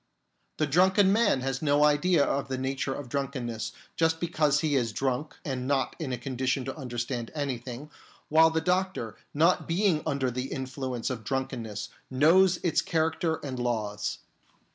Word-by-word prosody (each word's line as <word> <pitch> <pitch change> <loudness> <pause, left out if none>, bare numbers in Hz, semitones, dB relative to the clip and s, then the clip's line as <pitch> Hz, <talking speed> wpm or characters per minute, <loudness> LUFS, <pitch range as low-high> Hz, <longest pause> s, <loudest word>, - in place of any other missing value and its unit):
The 155 - +2
drunken 190 +6 +4
man 210 - +3
has 135 0 -2
no 145 -1 +3
idea 150 +1 +4
of 140 - -1
the 130 -1 -3
nature 135 +1 -2
of 145 - -7
drunken 135 -1 -3
ness, 115 -1 -4 0.2
just 160 0 +2
because 155 -4 +2
he 150 -3 +1
is 120 -4 0
drunk 135 +5 -2
and 130 -3 -3
not 135 -2 0
in 150 -5 -3
a 125 - -1
con 130 +2 -6
dition 130 0 0
to 135 - -4
understand 120 -3 -4
anything, 135 0 -4 0.4
while 160 +1 +6
the 160 0 0
doctor, 180 - -1 0.2
not 165 +5 +2
being 170 -2 +2
under 140 -4 0
the 125 +2 -4
influence 130 -2 -3
of 115 -4 -5
drunkenness, 115 -4 -3 0.2
knows 170 +7 +5
its 170 -3 +2
character 160 0 0
and 130 -3 -4
laws. 105 -4 -2
140 Hz, 165 wpm, -28 LUFS, 125-160 Hz, 0.4 s, while